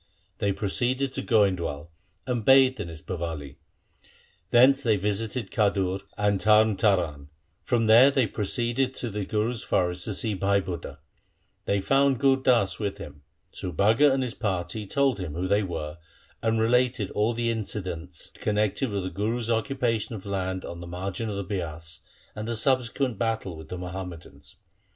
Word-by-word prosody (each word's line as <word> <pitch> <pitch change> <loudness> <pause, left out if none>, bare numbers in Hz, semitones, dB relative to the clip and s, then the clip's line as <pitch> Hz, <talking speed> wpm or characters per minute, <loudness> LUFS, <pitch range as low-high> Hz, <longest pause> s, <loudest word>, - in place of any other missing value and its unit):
They 100 -2 +1
proceeded 125 +7 -1
to 135 - -3
Goindwal, 90 - +1 0.4
and 125 -3 -1
bathed 130 0 +5
in 100 - -4
its 80 0 -10
Bawali. 80 -7 -5 0.9
Thence 130 +4 +6
they 115 -5 +3
visited 105 +2 -2
Khadur 100 -3 +1 0.2
and 105 -2 +1
Tarn 110 0 +5
Taran. 85 -9 +1 0.3
From 115 -2 +1
there 115 +5 +8
they 135 -3 +2
proceeded 120 +5 -1
to 120 - -4
the 100 -1 -3
Guru's 110 +4 -1
forest 90 -1 0
to 105 - -2
see 110 +1 0
Bhai 100 +1 +2
Budha. 85 -6 -6 0.7
They 100 -1 +1
found 135 +4 +3
Gur 135 -1 +4
Das 125 -7 +2
with 100 -2 -2
him. 70 - -10 0.3
Subhaga 110 - +3
and 135 0 +1
his 125 -2 -3
party 105 0 -3
told 140 +3 +2
them 85 -6 -5
who 90 +2 -2
they 100 +2 +3
were, 80 -4 -5 0.4
and 110 0 +1
related 120 -2 +2
all 110 +3 +1
the 115 0 0
incidents 90 -6 -4
connected 105 +5 0
with 100 -2 -2
the 95 - -4
Guru's 115 +4 -2
occupa 115 0 0
tion 115 - -6
of 100 - -9
land 95 -2 -3
on 85 - -7
the 85 - -8
margin 95 +5 -4
of 105 - -3
the 100 - -3
Bias 85 -4 -4 0.3
and 110 +1 -6
the 115 - -1
subsequent 125 -1 0
battle 110 -6 -1
with 80 -1 -11
the 90 - -5
Muhammadans. 90 -6 -8
105 Hz, 165 wpm, -26 LUFS, 90-120 Hz, 0.9 s, there